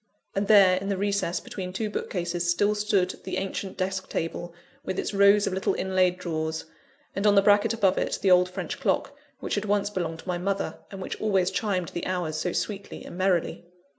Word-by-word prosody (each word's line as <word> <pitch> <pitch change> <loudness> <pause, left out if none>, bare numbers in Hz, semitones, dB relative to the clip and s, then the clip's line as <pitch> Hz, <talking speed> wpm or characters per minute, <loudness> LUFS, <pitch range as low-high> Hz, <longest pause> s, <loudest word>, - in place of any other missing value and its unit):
And 200 +1 -1
there, 195 -4 +7
in 195 +2 -3
the 200 - 0
recess 200 -3 0
between 185 -2 -6
two 215 +4 -2
bookcases, 175 -4 -2
still 205 +4 +3
stood 205 -3 0
the - - -3
ancient 195 0 -4
desk 190 0 -2
table, 170 +1 -3 0.3
with 190 - -4
its - - -2
rows 200 +1 +5
of - - -1
little 190 +1 0
inlaid 185 -1 +1
drawers; 160 -3 -3 0.5
and 200 +2 +1
on 205 - +5
the 200 - +7
bracket 205 +2 +4
above 200 -5 +2
it - - -1
the 190 - +4
old 180 0 +5
French 180 - -5
clock, 285 - 0 0.3
which - - -3
had 205 0 0
once 205 0 +1
belonged 170 -4 -3
to - - -20
my 180 -1 -1
mother, 195 +2 -2
and 195 -1 -7
which - - -6
always 195 -4 +2
chimed 190 -4 -1
the 175 - -4
hours 175 -4 -2
so 165 +3 -1
sweetly 200 +1 -4
and - - -9
merrily. 185 -2 0
190 Hz, 205 wpm, -26 LUFS, 180-200 Hz, 0.5 s, there